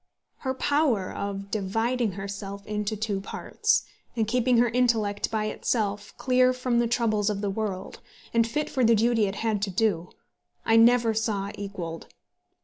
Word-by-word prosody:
Her 260 -1 -3
power 275 -9 +1
of 200 0 -5
dividing 225 +2 0
herself 200 +1 -6
into 210 0 -2
two 205 -2 -2
parts, 435 - 0 0.3
and 225 -2 0
keeping 250 +1 +2
her 240 +1 +5
intellect 225 -4 +1
by 215 -1 -1
itself 210 -2 -2
clear 255 -1 +3
from 250 -1 0
the 240 - +2
troubles 220 -3 +1
of 205 -1 -2
the 200 -2 -1
world, 195 -2 -4 0.3
and 230 -1 +3
fit 300 +6 -1
for 260 - 0
the 230 0 +5
duty 225 -1 +3
it 195 - -4
had 215 -3 +1
to 200 - 0
do, 180 -3 0 0.6
I 225 - +4
never 230 0 +5
saw 210 -3 -1
equalled. 180 -5 -6
220 Hz, 160 wpm, -26 LUFS, 200-240 Hz, 0.6 s, her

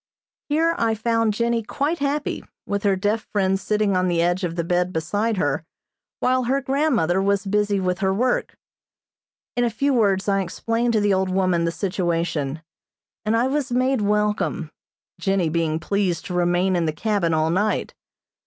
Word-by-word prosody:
Here 325 +3 +2
I 225 -1 +2
found 230 0 +1
Jennie 235 +1 +1
quite 285 +9 -2
happy, 285 +1 -1 0.2
with 200 0 -2
her 200 -1 +2
deaf 205 +3 -1
friend 195 -2 +1
sitting 210 -1 0
on 185 0 +2
the 175 -1 +1
edge 175 +3 +1
of 170 -2 -2
the 170 - -1
bed 180 +1 0
beside 205 +7 -1
her, 145 -2 0 0.6
while 255 0 +2
her 270 +3 +1
grandmother 265 - +1
was 200 0 +1
busy 205 0 +1
with 180 -1 -1
her 190 -1 +1
work. 245 +6 0 1.0
In 245 - +1
a 240 - +2
few 275 +6 0
words 200 -5 +2
I 195 -1 +2
explained 230 +6 -1
to 215 - +2
the 205 -1 +3
old 190 0 +1
woman 185 -2 +1
the 170 - 0
situation, 170 -6 -2 0.6
and 220 +2 +2
I 235 - +2
was 270 -1 -1
made 255 0 +1
welcome, 210 +1 0 0.5
Jennie 195 -4 +1
being 160 -1 0
pleased 185 +1 -1
to 180 - -5
remain 180 +1 +2
in 170 -2 +1
the 155 - -1
cabin 200 -1 0
all 155 +1 +1
night. 205 +5 0
200 Hz, 175 wpm, -23 LUFS, 180-230 Hz, 1.0 s, the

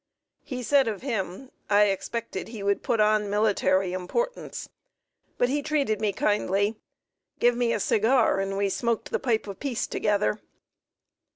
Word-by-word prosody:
He 250 -2 -5
said 275 0 +3
of 215 -1 -3
him: 225 -1 -4 0.2
"I 205 0 +6
expected 200 +1 -2
he 225 -3 -7
would 200 0 +1
put 230 - 0
on 210 -1 +3
military 195 -3 +2
importance, 475 - -3 0.7
but 245 - +3
he 285 +3 0
treated 280 -8 0
me 210 -2 +2
kindly, 205 +1 +1 0.6
give 240 0 +3
me 240 -1 +1
a - - 0
cigar, 220 +1 +3
and 195 0 -2
we 200 0 +1
smoked 230 +3 -1
the - - 0
pipe 230 -4 0
of 200 -2 -8
peace 265 -5 -2
together." 210 0 0
215 Hz, 155 wpm, -26 LUFS, 200-245 Hz, 0.7 s, I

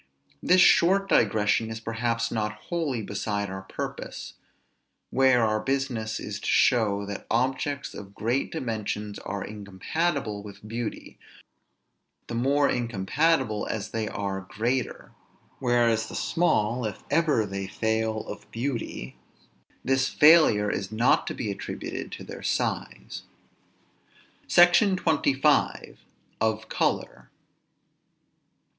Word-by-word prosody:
This 180 +1 +5
short 195 +3 +5
digression 110 - +2
is 110 0 -5
perhaps 115 +1 -2
not 105 -2 -1
wholly 135 +1 -3
beside 100 0 -3
our 95 0 -5
purpose, 95 - -6 0.8
where 130 -2 +4
our 110 0 +1
business 130 -4 -2
is 105 0 -5
to - - -6
show 105 -5 +3
that 100 0 -7
objects 135 +4 -1
of 100 0 -10
great 120 +5 -1
dimensions 105 -7 -4
are 100 0 -5
incompatible 105 - -3
with 105 +1 -11
beauty, 115 +1 -5 1.1
the - - -7
more 140 +4 +2
incompatible 120 +2 0
as 110 -1 -4
they 110 -1 -2
are 100 -1 -3
greater; 120 +4 -2 0.5
whereas 120 -3 +2
the - - -8
small, 125 -9 +1
if 105 -4 -5
ever 155 -9 +3
they 100 -1 -4
fail 110 +1 -1
of - - -9
beauty, 115 - -4 0.7
this 130 0 +2
failure 150 -10 +6
is 95 +1 -3
not 115 +3 +2
to - - -3
be 105 - -3
attributed 100 - -6
to - - -7
their - - -9
size. - - -3 1.3
SECTION 180 +3 +5
XXV. 150 -4 +1 0.5
OF 110 0 0
COLOR. - - -2
115 Hz, 115 wpm, -26 LUFS, 105-135 Hz, 1.3 s, failure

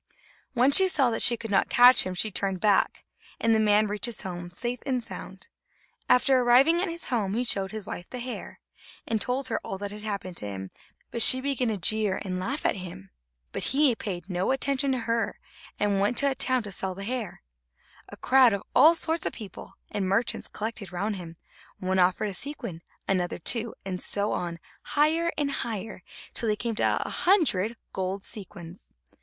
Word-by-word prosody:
When 255 +2 +3
she 380 +6 +7
saw 275 -9 +3
that 225 - -1
she 235 - +5
could 225 -1 -7
not 195 - +2
catch 245 -3 +7
him, 185 - -4
she 215 +4 +2
turned 195 -1 -1
back, 205 -1 +1 0.3
and 230 0 +2
the 220 - +3
man 210 0 +4
reached 210 +2 -1
his 235 - -2
home 175 -2 -6
safe 240 +7 -3
and 255 -3 -1
sound. - - -8 0.6
After 255 +1 +4
arriving 260 +8 +4
at 385 - -1
his 335 0 -4
home, 210 -5 -1
he 245 - 0
showed 195 -5 -1
his 215 -2 -6
wife 175 - -7
the 250 - -7
hair, 250 0 -7 0.5
and 220 -2 -1
told 255 +1 -1
her 225 - -1
all 195 - -5
that 200 +1 -5
had 210 +1 -8
happened 200 -4 -5
to 105 - -3
him, 95 -1 -7 0.4
but 235 - -1
she 260 +3 +8
began 265 -2 -1
to 220 -2 -1
jeer 210 +1 +1
and 185 -1 -3
laugh 265 +11 -3
at - - +1
him. 170 - -9 0.4
But - - -4
he 290 -4 +5
paid 190 -6 -6
no 180 -1 -2
attention 270 +1 +1
to 255 - -1
her, 230 0 -1 0.4
and 205 -1 +1
went 205 +5 +1
to 280 -1 +3
a - - 0
town 255 -2 +1
to 205 - -7
sell 190 -1 -3
the 195 - -7
hair. 235 -2 -5 0.7
A - - -11
crowd 255 -3 +5
of 200 - -3
all 325 +2 +7
sorts 325 0 +1
of - - -4
people 205 -6 -10 0.2
and 195 -2 -2
merchants 200 +5 0
collected 215 -3 -5
round 200 +4 -2
him; 170 -2 -10 0.4
one 190 0 -1
offered 185 +3 +2
a - - -6
sequin, 235 - -6 0.3
another 185 -2 0
two, 230 +6 +1
and 185 -2 -3
so 205 +1 -1
on, 170 -1 -3 0.2
higher 320 +3 +1
and 290 -1 0
higher, 220 -6 -4 0.3
till 230 - -2
they 210 - +2
came 230 +2 -3
to - - +1
a - - -4
hundred 240 - +1 0.2
gold 190 +1 -3
sequins. 185 -4 -8
215 Hz, 200 wpm, -26 LUFS, 190-255 Hz, 0.7 s, she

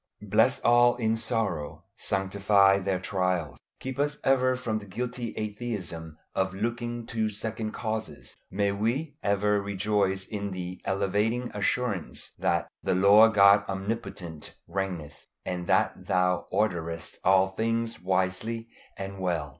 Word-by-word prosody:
Bless 110 +6 +3
all 120 0 +5
in 110 -2 +1
sorrow. 115 -9 -2
Sanctify 100 0 +3
their 95 -1 0
trials. 90 -4 -1 0.2
Keep 130 +1 -5
us 145 +1 +1
ever 130 -1 +3
from 115 -4 -2
the 100 - -12
guilty 120 +3 -4
atheism 100 -8 -5 0.2
of 95 0 0
looking 120 +2 -3
to 110 -2 -1
second 110 +1 -4
causes. 110 -1 -5
May 100 +1 +1
we 120 +10 -1
ever 100 0 +2
rejoice 100 -1 0
in 100 -1 -4
the 90 0 -6
elevating 105 +5 0
assurance 105 -2 -1
that - - +1
"the - - 0
Lord 105 +4 +7
God 100 0 +7
Omnipotent 95 -5 -5
reigneth," 85 -5 -4 0.2
and 90 -1 -3
that - - +1
Thou 90 0 +1
orderest 85 -5 -2
all 95 0 +5
things 115 -1 -1
wisely 95 +5 -1 0.3
and 95 0 -6
well. 85 -5 -1
100 Hz, 130 wpm, -28 LUFS, 95-115 Hz, 0.3 s, Lord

